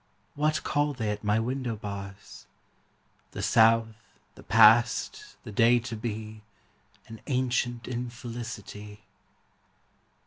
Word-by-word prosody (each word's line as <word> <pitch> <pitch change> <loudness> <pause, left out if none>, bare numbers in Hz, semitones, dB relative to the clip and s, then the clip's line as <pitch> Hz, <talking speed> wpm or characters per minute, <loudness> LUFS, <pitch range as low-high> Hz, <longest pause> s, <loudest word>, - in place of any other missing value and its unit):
What 155 +1 0
call 145 0 0
they 110 -5 -2
at 105 +1 -5
my 105 +1 +2
window 125 0 -2
bars? 100 -1 -9 0.9
The - - -5
South, 115 -1 +2 0.2
the - - -15
past, 115 +2 +4
the - - -8
day 115 +3 +4
to 115 0 -6
be, 110 -1 -6 0.7
An 110 -1 -11
ancient 125 -2 -1
infelicity. 115 -4 -7
115 Hz, 105 wpm, -27 LUFS, 105-120 Hz, 0.9 s, past